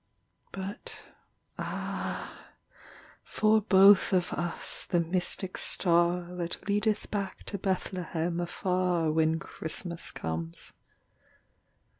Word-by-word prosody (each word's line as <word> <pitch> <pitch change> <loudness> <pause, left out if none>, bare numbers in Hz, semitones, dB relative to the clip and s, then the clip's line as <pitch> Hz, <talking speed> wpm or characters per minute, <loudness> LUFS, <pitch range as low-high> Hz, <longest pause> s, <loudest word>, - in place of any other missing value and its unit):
But 195 +1 -6 0.6
ah, - - -5 0.8
for 215 0 +2
both 195 -1 +6
of 180 -2 +1
us 175 -1 -2
the 175 - +2
mystic 180 +2 0
star 175 0 +3
That 175 +2 -4
leadeth 210 +1 0
back 200 -3 -3
to 200 - -4
Bethlehem 175 -3 -2
afar, 175 -2 0
When 160 +1 +2
Christmas 170 +2 -4
comes. 80 +1 -5
180 Hz, 90 wpm, -29 LUFS, 170-195 Hz, 0.8 s, both